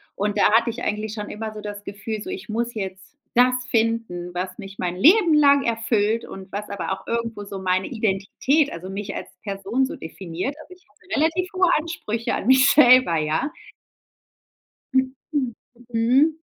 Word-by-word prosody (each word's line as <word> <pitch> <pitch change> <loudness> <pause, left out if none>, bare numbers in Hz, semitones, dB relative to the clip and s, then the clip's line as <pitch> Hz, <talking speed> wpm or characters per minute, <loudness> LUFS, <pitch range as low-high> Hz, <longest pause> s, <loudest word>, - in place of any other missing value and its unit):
Und 205 +1 -1
da 205 - +5
hatte 230 +1 +4
ich 235 +1 -5
eigentlich 215 -1 -2
schon 210 -1 -5
immer 220 +1 -5
so 215 - -8
das 205 -1 -7
Gefühl, 205 +2 -5
so, - - -7
ich 380 0 -6
muss 235 +2 -2
jetzt 190 +5 -7 0.2
das 250 +1 +3
finden, 225 -7 -1
was 180 +1 -4
mich 195 -1 -9
mein 180 0 -2
Leben 340 - +5
lang 280 -2 +5
erfüllt 225 -1 +1
und 190 0 -10
was 210 +1 -4
aber 200 -1 -3
auch 190 0 -8
irgendwo 230 -2 -3
so 200 -1 -7
meine 185 0 0
Identität, 225 +7 0
also 180 +3 -7
mich 200 +1 -5
als - - -6 0.2
Person 200 +5 -1
so - - -6
definiert. 180 - -5
Also 365 - -13
ich 365 - -22
hatte 300 +7 -13
relativ 330 +4 +1
hohe 370 0 +3
Ansprüche 300 -8 -3
an - - -3
mich 260 +1 +6
selber, 255 - +6
ja. 155 - 0 1.4
Mhm, 260 0 +2 0.2
mhm. 285 -4 +1 0.5
Mhm. 255 +8 +3
225 Hz, 180 wpm, -23 LUFS, 195-260 Hz, 1.4 s, mich